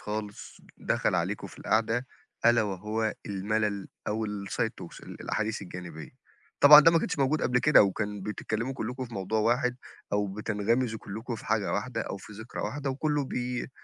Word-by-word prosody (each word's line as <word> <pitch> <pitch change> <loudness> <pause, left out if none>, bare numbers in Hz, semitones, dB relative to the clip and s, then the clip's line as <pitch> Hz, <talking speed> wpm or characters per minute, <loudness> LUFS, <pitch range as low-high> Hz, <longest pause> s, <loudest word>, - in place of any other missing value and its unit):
خالص 105 -1 -6 0.2
دَخَل - - 0
عليكم - - -1
في - - -14
القعدة 115 +3 +1 0.4
ألا 120 -1 +6
وهو 105 +3 -2
المَلَل 100 0 -1 0.2
أو 110 +1 -1
الside 100 -1 -2
talks، - - -10
الأحاديث 110 0 -3
الجانبية. 85 -4 -8 0.5
طبعًا 150 +1 +11
ده 165 - +7
ما 165 - +4
كانش 155 - -2
موجود 140 +3 +2
قبل 125 0 +3
كده 150 -1 +6
وكان 105 0 -2
بتتكلِّموا 110 +4 -3
كُلّكم 125 +1 -4
في 115 - -10
موضوع 100 +3 -1
واحد 125 +3 +2 0.4
أو 105 0 +2
بتنغمزوا 110 +3 -1
كُلّكم 110 +5 -6
في 110 - -9
حاجة 105 -2 +1
واحدة 115 +3 -2
أو - - -4
في 100 - -12
ذِكرى 110 +3 -7
واحدة 140 -1 -2
وكُلّه 145 +1 0
بي 125 0 -3
110 Hz, 165 wpm, -28 LUFS, 105-125 Hz, 0.5 s, طبعًا